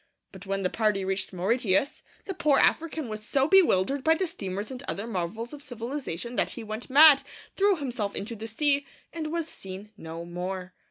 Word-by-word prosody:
But 195 0 -12
when 195 0 -1
the 185 - +1
party 210 -4 +1
reached 190 0 -2
Mauritius, 200 +6 +1 0.2
the 385 - -4
poor 305 -6 +3
African 315 -2 +2
was 215 -1 -5
so 270 +5 +1
bewildered 280 - +4
by 320 0 +5
the 375 - 0
steamers 205 - -5
and 255 -1 -6
other 200 - -3
marvels 225 +3 -4
of 290 - -9
civilization 245 - -5
that - - +2
he 235 - -5
went 215 +3 -6
mad, 285 +1 +8 0.3
threw 400 0 +4
himself 245 - -3
into 220 +4 -4
the 220 +1 -7
sea, 280 +4 +1 0.3
and 315 -2 -4
was 335 -1 -2
seen 195 -4 -9
no 165 -2 -7
more. 180 +1 -5
230 Hz, 185 wpm, -27 LUFS, 195-285 Hz, 0.3 s, mad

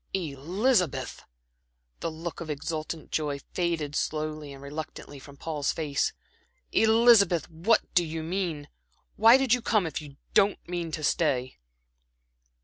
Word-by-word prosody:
"Elizabeth!" 180 - 0 0.8
The - - -2
look 165 +2 -6
of 165 - -6
exultant 155 +2 -4
joy 145 -2 -1
faded 165 -5 -1
slowly 155 -1 -2
and 135 0 -11
reluctantly 145 -1 -7
from 140 +1 -14
Paul's 150 -2 -2
face. 150 -3 -1 0.6
"Elizabeth, 220 -5 +5
what 170 +8 +3
do 175 - +4
you 160 -1 -4
mean? 165 -4 -3 0.5
Why 225 +4 +7
did 265 -3 +2
you 250 - +2
come 215 -4 +2
if 160 -2 -3
you 140 -2 -12 0.2
don't 200 0 +4
mean 175 -1 -3
to 155 - -3
stay?" 130 -4 0
160 Hz, 135 wpm, -27 LUFS, 150-185 Hz, 0.8 s, Why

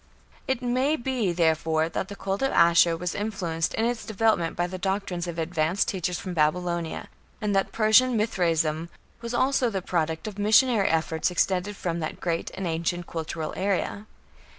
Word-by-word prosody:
It 265 -1 -1
may 255 +5 +1
be, 240 - -1
therefore, 160 -1 +1
that 170 +3 -3
the 200 - -8
cult 195 0 -3
of 270 - +1
Ashur 170 0 +5
was 175 +1 -3
influenced 185 -6 -2
in 225 - +1
its 240 -1 -1
development 215 -6 +1
by 175 - 0
the 185 +1 -6
doctrines 190 -2 -2
of 170 -1 -5
advanced 165 +2 0
teachers 180 -2 -2
from 185 - -6
Babylonia, 170 +1 -1 0.3
and 210 -3 -1
that 195 - +1
Persian 230 +3 +4
Mithraism 165 -6 0 0.3
was 235 +1 -4
also 260 -1 +2
the 190 -4 -3
product 160 0 -1
of 205 -1 -7
missionary 215 0 +4
efforts 160 0 0
extended 185 +3 0
from 170 -3 -3
that 155 -1 -4
great 170 -2 -2
and 190 - -4
ancient 170 +1 -2
cultural 160 -1 -4
area. 200 +2 -1
180 Hz, 170 wpm, -26 LUFS, 165-215 Hz, 0.3 s, Ashur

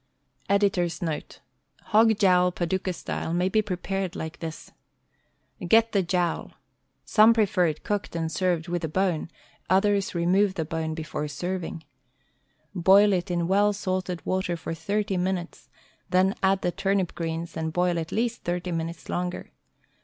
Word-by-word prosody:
Editor's 195 -4 +2
Note: 160 -3 -4 0.2
— - - -36
Hog 220 0 +5
Jowl, 180 -3 +4
Paducah. 185 +2 -2
Style,, 165 -1 -4
may, 180 +2 +1
be 215 +2 +3
pre 205 -3 -3
pared 190 0 -3
like 160 +1 -6
this: 160 -1 -7 1.0
Get 225 +4 +5
the 200 - +2
jowl. 175 -1 -1 0.5
Some 215 +11 +6
prefer 205 -5 +3
it 155 -1 -4
cooked 205 -4 -3
and 165 -1 -2
served 175 -2 0
with 175 0 -2
the 160 - -2
bone; 175 -1 0 0.4
others 195 +1 +2
remove 185 +3 +2
the 160 - -2
bone 160 0 -3
before 155 -1 -4
serving. 165 +2 -4 0.9
Boil 195 +3 +5
it 180 -1 -1
in 175 -1 0
well 205 +2 +3
salted 185 -3 -3
water 185 -2 -1
for 165 - -5
thirty 200 +5 -1
minutes, 180 -1 -3 0.4
then 185 +1 +3
add 190 0 +2
the 175 - +1
turnip 195 -1 0
greens 165 0 -4
and 160 0 -2
boil 175 0 +1
at 165 0 -5
least 235 +1 -1
thirty 175 +1 -2
minutes 165 0 -4
longer. 180 0 -3
180 Hz, 155 wpm, -26 LUFS, 170-195 Hz, 1.0 s, Some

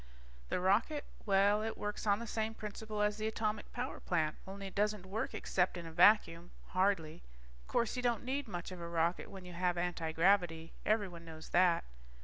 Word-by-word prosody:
The - - 0
rocket? 215 +11 +2 0.2
Well, 200 +1 +4
it 220 +1 -3
works 210 +1 -4
on 200 0 +4
the 235 - -6
same 220 0 -2
principle 215 0 -4
as 210 0 +1
the 215 0 -1
atomic 215 -1 -2
power 250 +2 -4
plant, 155 -4 0
only 195 +1 -7
it 195 - -7
doesn't 210 -2 0
work 200 +4 -3
except 180 0 0
in 170 - -6
a 165 - -7
vacuum, 175 -1 +5 0.2
hardly. 185 -4 +1 0.5
Course 235 +1 0
you 250 - -2
don't 240 -2 0
need 270 +1 -2
much 180 -3 -5
of 180 -2 -7
a 170 - -4
rocket 170 +1 0
when 190 -2 -9
you 180 - -9
have 175 0 0
antigravity. 165 0 +1 0.2
Everyone 195 -6 0
knows 160 -1 -10
that. 175 -1 +4
195 Hz, 185 wpm, -34 LUFS, 175-215 Hz, 0.5 s, vacuum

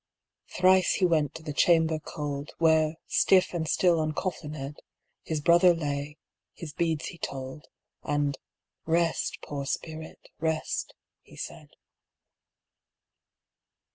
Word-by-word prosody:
Thrice 185 0 +4
he 185 - +2
went 155 -5 +1
to 160 - -8
the 150 -2 -5
chamber 160 0 +3
cold, 145 -1 -5
Where, 160 -1 +3
stiff 185 -2 +3
and 165 -2 -2
still 175 -2 +3
uncoffinèd, 155 -3 -3 0.4
His 155 -2 -3
brother 175 +2 +6
lay, 145 -1 -3 0.4
his 155 -3 -8
beads 160 -2 -1
he 170 - -12
told, 135 +2 -6 0.3
And 145 -1 0 0.5
"Rest, 165 0 +1
poor 140 -2 -5
spirit, 160 +2 -6
rest," 160 -1 -2 0.3
he - - -17
said. - - -8
160 Hz, 110 wpm, -28 LUFS, 145-170 Hz, 0.5 s, brother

